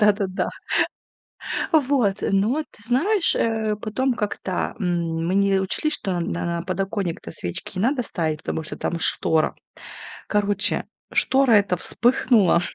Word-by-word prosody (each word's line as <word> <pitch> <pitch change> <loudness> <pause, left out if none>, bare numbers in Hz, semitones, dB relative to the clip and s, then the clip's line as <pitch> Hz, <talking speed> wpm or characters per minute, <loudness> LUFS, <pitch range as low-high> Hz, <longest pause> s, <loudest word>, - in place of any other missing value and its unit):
Да-да-да. 200 -3 +2 1.2
Вот, 265 -10 +3 0.2
но 220 +10 +2
ты - - -17
знаешь, 335 - +2
э, 220 -2 0
потом 250 +4 0
как-то, 205 -4 -3
м, 170 -3 -1
мы 185 - 0
не 195 -1 +3
учли, 190 +10 0
что 190 -10 0
на 170 - -3
на 170 0 -2
подоконник-то 190 -1 -3
свечки 90 - -5
не - - 0
надо 255 +2 +1
ставить, 160 -8 -2
потому 160 - -3
что - - -7
там 170 - -2
штора. 160 -1 +2 0.7
Короче, 205 -1 +1 0.3
штора 265 -2 +3
эта 200 -4 +4
вспыхнула. 235 -3 +3
200 Hz, 130 wpm, -23 LUFS, 180-235 Hz, 1.2 s, эта